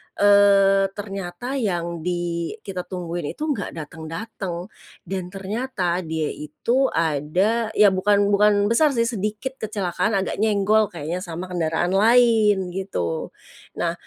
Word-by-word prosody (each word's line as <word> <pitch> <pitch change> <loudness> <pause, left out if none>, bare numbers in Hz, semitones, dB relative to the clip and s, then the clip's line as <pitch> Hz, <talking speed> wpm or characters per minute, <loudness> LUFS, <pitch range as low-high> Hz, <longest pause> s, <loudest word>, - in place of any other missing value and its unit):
eee, 200 -1 +5
ternyata 200 +5 -5
yang 170 -6 -2
di 170 0 -2
kita 185 -3 -6
tungguin 175 -3 -4
itu - - -6
nggak 205 -9 -4
datang-datang 170 +4 -6 0.3
dan 185 -2 -4
ternyata 195 -1 -2
dia 160 -1 -2
itu 235 - 0
ada 165 +9 +1
ya 210 -2 +6
bukan 200 +2 +2
bukan 205 0 +3
besar 290 +3 +3
sih 230 - +3
sedikit 230 +3 -3
kecelakaan 205 -1 -1
agak - - -4
nyenggol 215 0 +3
kayaknya 170 +1 -5
sama 180 0 -6
kendaraan 170 0 0
lain 215 -3 +4
gitu. 175 - -3 0.5
Nah - - 0
195 Hz, 125 wpm, -23 LUFS, 175-210 Hz, 0.5 s, ya